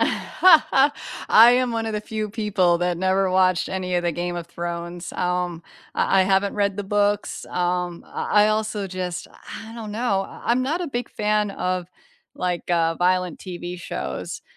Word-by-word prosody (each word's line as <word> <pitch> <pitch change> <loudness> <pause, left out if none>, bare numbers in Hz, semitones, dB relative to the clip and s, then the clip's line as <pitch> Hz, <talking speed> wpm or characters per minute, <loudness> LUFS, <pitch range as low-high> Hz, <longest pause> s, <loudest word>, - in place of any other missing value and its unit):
I 280 -8 +4
am 250 -2 0
one 225 0 -2
of 220 - -3
the 210 - -1
few 215 0 -4
people 200 -5 +1
that 175 -1 -1
never 190 +1 +2
watched 185 -1 +2
any 185 -1 -2
of 175 - +1
the 175 -1 0
Game 175 +1 -3
of 170 -1 -5
Thrones. 170 +1 -5
Um, 180 -1 -1 0.3
I - - +2
I - - +6
haven't 195 +1 +1
read 200 -2 0
the 205 - -4
books, 205 +1 0
um, 180 -1 -2
I 210 0 +2
I - - +3
also 215 -1 -1
just 180 -2 -4 0.4
I 220 - -10
don't 220 -3 -7
know. 210 -3 0
I - - -11
I'm 245 +2 +2
not 305 +7 -1
a 355 - -2
big 245 -5 -4
fan 210 0 0
of, 185 -2 -2 0.5
like, 180 -1 -3
uh, 165 -1 +2
violent 180 -1 +1
TV 175 -1 -7
shows. 170 - -5
190 Hz, 175 wpm, -23 LUFS, 180-215 Hz, 0.5 s, I